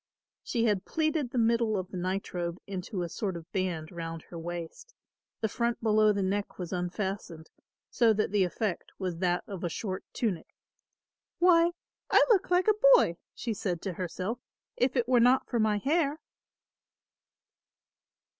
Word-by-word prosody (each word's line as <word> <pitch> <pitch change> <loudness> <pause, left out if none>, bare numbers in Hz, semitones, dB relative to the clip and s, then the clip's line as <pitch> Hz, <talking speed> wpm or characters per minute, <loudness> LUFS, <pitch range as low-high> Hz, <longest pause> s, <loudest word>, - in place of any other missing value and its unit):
She 235 -2 -1
had 205 -4 +1
pleated 310 -4 0
the 250 - -5
middle 230 -2 +2
of 185 -1 -4
the 185 - -5
nightrobe 180 -1 -3
into 190 -1 -4
a - - -2
sort 190 +1 -3
of 165 0 -12
band 175 -5 -2
round 165 -1 -6
her 170 - -9
waist; 175 - -7 0.5
the 220 - +2
front 235 +2 -1
below 215 -1 +4
the 200 -1 0
neck 200 +2 -2
was 180 0 -5
unfastened, 180 -2 -4 0.4
so 230 -2 +4
that 215 -2 0
the 205 -2 +3
effect 185 +1 -3
was 180 -3 -3
that 180 -1 +1
of 195 -3 -7
a 175 - 0
short 185 +2 -4
tunic. 205 -9 -3 0.8
"Why, 345 -1 +5 0.4
I - - +6
look 390 -5 +3
like 360 +2 +3
a 430 - +6 0.2
boy!" 170 - +2 0.2
she 230 - -3
said 180 -4 -2
to 190 - -3
herself; 185 +6 -4 0.4
"if 250 +1 +1
it 240 -2 +1
were 250 -1 +4
not 250 +2 +4
for 240 - -1
my 215 -1 +2
hair." 295 +4 +1
200 Hz, 165 wpm, -29 LUFS, 180-235 Hz, 0.8 s, I